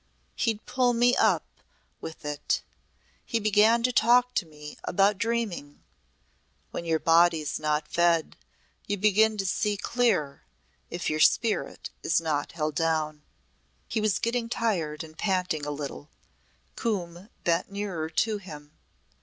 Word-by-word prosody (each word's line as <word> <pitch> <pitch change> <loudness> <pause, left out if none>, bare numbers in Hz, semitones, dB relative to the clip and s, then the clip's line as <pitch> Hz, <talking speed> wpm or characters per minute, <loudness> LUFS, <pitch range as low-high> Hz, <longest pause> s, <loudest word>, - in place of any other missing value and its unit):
He'd 220 -2 -1
pull 250 -1 +2
me 245 +1 +4
up - - +3 0.5
with 160 -1 -9
it. 145 0 -1 0.6
He 230 - -1
began 215 +2 +4
to 250 - +3
talk 245 +2 +4
to 180 - -1
me 150 -1 -10
about 195 +2 +2
dreaming. 225 -11 -3 0.9
When 170 - -5
your 165 -1 +2
body's 165 -2 +3
not 150 0 0
fed 170 -2 +2 0.5
you 205 - -1
begin 215 +2 +3
to 195 - -1
see 205 +2 0
clear 215 - 0 0.5
if 175 - -4
your 155 - -1
spirit 220 +7 +1
is 160 - +2
not 155 -3 -2
held 155 -2 -2
down." 155 -1 0 0.7
He 220 - -1
was 215 -2 +2
getting 235 0 -1
tired 170 -11 -1
and 160 0 -12
panting 180 -6 -1
a - - -2
little. 145 0 -6 0.7
Coombe 190 -4 -3
bent 170 +3 +1
nearer 195 -6 -3
to 210 +6 0
him. 150 -6 -11
180 Hz, 135 wpm, -27 LUFS, 155-220 Hz, 0.9 s, me